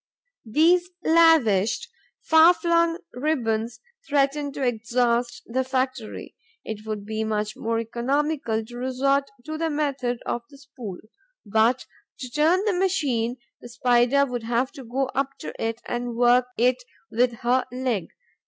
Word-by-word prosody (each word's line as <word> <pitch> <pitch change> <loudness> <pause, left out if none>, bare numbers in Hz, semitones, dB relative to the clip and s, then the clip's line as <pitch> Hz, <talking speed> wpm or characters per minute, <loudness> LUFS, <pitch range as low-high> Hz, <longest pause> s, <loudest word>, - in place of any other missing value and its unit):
These 345 +8 +3
lavished, 320 - +4 0.4
far 320 +2 +6
flung 335 0 +2 0.2
ribbons 240 -5 -1 0.3
threaten 285 0 +1
to 275 - -4
exhaust 240 0 0
the 260 +3 -1
factory; 260 -3 -3 0.3
it 215 0 -6
would 210 -2 -4
be 220 +1 -2
much 215 -1 -2
more 230 0 -2
economical 240 0 -1
to 240 +2 -10
resort 275 +2 0 0.2
to 310 0 -5
the 325 0 0
method 275 -5 -1
of 240 - -2
the 280 - -15
spool; 255 -9 -9 0.5
but, 220 +4 +2 0.3
to 255 -2 -7
turn 330 - +2
the 425 - +2
machine, 285 -11 0 0.2
the 240 - -11
Spider 245 +3 +3
would 245 -3 -4
have 235 +3 0
to 275 -4 -10
go 255 +3 -1
up 275 0 -2
to - - -7
it 225 +1 -3
and 240 -1 -3
work 245 +1 +4
it 250 +2 +2 0.3
with 240 +2 +2
her 250 +2 +2
leg. 250 -7 -2
250 Hz, 145 wpm, -24 LUFS, 230-290 Hz, 0.5 s, far